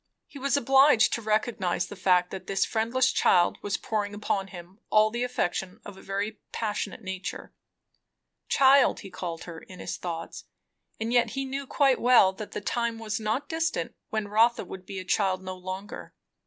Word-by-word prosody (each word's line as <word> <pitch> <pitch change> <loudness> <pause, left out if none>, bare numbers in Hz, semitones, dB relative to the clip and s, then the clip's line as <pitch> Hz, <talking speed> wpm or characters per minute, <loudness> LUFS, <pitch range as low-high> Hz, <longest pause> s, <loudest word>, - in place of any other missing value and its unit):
He 280 - -12
was 280 +2 +1
obliged 270 -2 +5
to 235 - -1
recognize 215 -5 0
the 205 - -9
fact, 180 -2 +2
that 190 - -7
this 195 -1 +1
friendless 240 +3 +1
child 175 -1 +3
was 205 - -1
pouring 205 -2 -3
upon 200 -2 -1
him 185 +1 -12
all 215 0 +4
the 240 +2 -3
affection 190 -6 -2
of 205 - -9
a 190 - -13
very 200 +2 -3
passionate 210 0 -3
nature. 190 -1 -6 1.0
Child, 275 0 +5
he 195 - -10
called 170 -3 -5
her 165 -2 -8
in 185 - -13
his - - -5
thoughts, 165 -2 -6 0.5
and 225 +2 -2
yet 240 -1 +4
he 270 - -1
knew 270 +1 -4
quite 275 -2 +2
well 235 -6 +6
that 210 +2 -8
the - - -4
time 235 +1 -1
was 215 -1 -3
not 220 +6 -2
distant 330 +1 -2 0.2
when 215 -1 -2
Rotha 225 +2 +3
would 185 0 -10
be 195 - -6
a 185 - -5
child 190 -1 +1
no 185 0 -5
longer. 185 +2 -7
210 Hz, 180 wpm, -27 LUFS, 190-240 Hz, 1.0 s, well